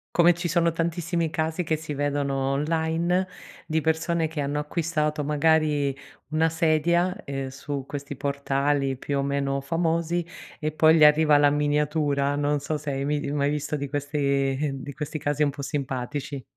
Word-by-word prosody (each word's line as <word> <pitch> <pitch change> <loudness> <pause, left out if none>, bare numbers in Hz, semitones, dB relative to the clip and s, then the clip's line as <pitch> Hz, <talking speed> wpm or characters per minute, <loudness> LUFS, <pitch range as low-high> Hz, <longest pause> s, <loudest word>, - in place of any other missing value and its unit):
Come 175 0 +6
ci 175 0 -3
sono 170 +1 +2
tantissimi 165 0 -1
casi 160 +2 -1
che 160 - 0
si 155 -1 -6
vedono 145 -1 -1 0.2
online, 165 +5 0 0.4
di 160 0 0
persone, 160 +1 +1
che 155 -1 -4
hanno 145 +1 -1
acquistato 150 -1 -1
magari 150 -2 +2 0.4
una 160 +1 +3
sedia, 170 +3 +2
uhm, 135 -1 -3
su 140 0 -5
questi 140 0 -6
portali 140 0 0
più 140 +2 -3
o 140 - 0
meno 140 0 0
famosi, 165 +3 0 0.4
e 155 0 -1
poi 160 +1 +5
gli 155 - +6
arriva 150 0 +6
la 145 0 +5
miniatura. 145 -1 +1
Non 145 0 +1
so 150 +2 -2
se 150 -1 -4
hai 135 0 -2
mei 145 -1 -1
mai 145 -1 +1
visto 150 0 -2
di 140 -1 -4
questi 140 -1 0
di 145 - -7
questi 150 +2 -4
casi 145 0 -2
un 150 - +4
po' 140 0 -7
simpatici. 135 0 -4
150 Hz, 165 wpm, -25 LUFS, 140-160 Hz, 0.4 s, Come